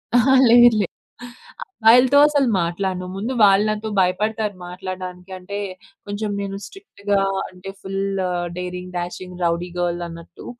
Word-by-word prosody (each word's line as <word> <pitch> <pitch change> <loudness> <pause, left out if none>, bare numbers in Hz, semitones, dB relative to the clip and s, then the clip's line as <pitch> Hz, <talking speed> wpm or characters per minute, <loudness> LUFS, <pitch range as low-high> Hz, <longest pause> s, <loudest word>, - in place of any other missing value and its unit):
అహా, 245 +2 +5 0.2
లేదులే 235 -4 +6 0.8
అబ్బాయిలతో 250 - +4
అసలు 285 -3 +2
మాట్లాడను. 180 +2 -2
ముందు 220 +7 -3
వాళ్ళు 200 0 +5
నాతో 215 +1 -3
భయపడతారు 210 +3 0
మాట్లాడడానికి. 185 0 -7
అంటే 195 +3 -7 0.5
కొంచెం 205 +1 -4
నేను 195 -1 -4
స్ట్రిక్ట్‌గా 205 - -3 0.3
అంటే, 185 +1 -11
full 195 0 -4 0.6
daring, 180 0 -6
dashing, 180 +1 -6
rowdy 170 +1 0
girl 175 0 -1
అన్నట్టు. 170 0 -12
195 Hz, 120 wpm, -21 LUFS, 180-220 Hz, 0.8 s, లేదులే